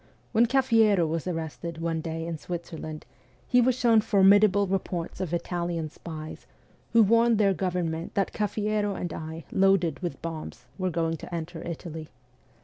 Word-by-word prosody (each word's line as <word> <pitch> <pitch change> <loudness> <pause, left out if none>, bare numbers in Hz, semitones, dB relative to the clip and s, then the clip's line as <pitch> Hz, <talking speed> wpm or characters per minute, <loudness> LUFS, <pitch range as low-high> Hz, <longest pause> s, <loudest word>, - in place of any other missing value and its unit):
When 235 +1 +4
Cafiero 225 -8 +4
was 165 +2 -3
arrested 165 -1 -4
one 165 -1 -2
day 165 0 -4
in 165 -2 -4
Switzerland, 165 -3 -6 0.4
he 245 -1 +4
was 250 +1 +3
shown 230 -3 +4
formidable 205 0 +5
reports 185 -2 -3
of 180 -4 -3
Italian 170 -2 -2
spies, 155 -2 -8 0.5
who 230 -1 +7
warned 230 +2 +4
their 200 -2 +3
government 175 -2 -2
that 195 - 0
Cafiero 210 -1 -1
and 175 - -4
I, 160 0 -7
loaded 195 -3 +3
with 175 -7 -4
bombs, 165 -2 -6
were 185 0 0
going 165 -1 -1
to - - -10
enter 165 0 -5
Italy. 160 -2 -6
175 Hz, 150 wpm, -27 LUFS, 165-205 Hz, 0.5 s, who